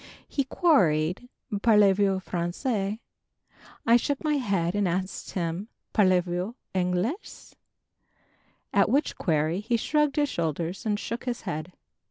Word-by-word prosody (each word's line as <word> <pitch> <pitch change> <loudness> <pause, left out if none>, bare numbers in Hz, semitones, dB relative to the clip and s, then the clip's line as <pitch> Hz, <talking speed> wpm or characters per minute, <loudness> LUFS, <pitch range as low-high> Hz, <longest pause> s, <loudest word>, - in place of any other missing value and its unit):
He 275 - -1
queried 190 - +2 0.3
"Parlez 210 -4 +5
vous 195 -1 +2
Français?" 195 +4 -2 0.9
I 235 0 +6
shook 280 +5 -2
my 300 -1 +2
head 195 -9 0
and 205 -2 +1
asked 185 +2 -3
him 175 +2 -2 0.3
"Parlez 185 -4 +4
vous 180 +6 -3 0.2
Anglaise?" 185 - -2 1.2
at - - +4
which 285 +3 +1
query 160 0 +1
he 230 +3 0
shrugged 300 +4 +1
his 295 -1 +2
shoulders 170 - -3
and 205 -1 0
shook 235 +2 -5
his 245 -2 -3
head! 175 -2 -5
195 Hz, 130 wpm, -27 LUFS, 175-240 Hz, 1.2 s, I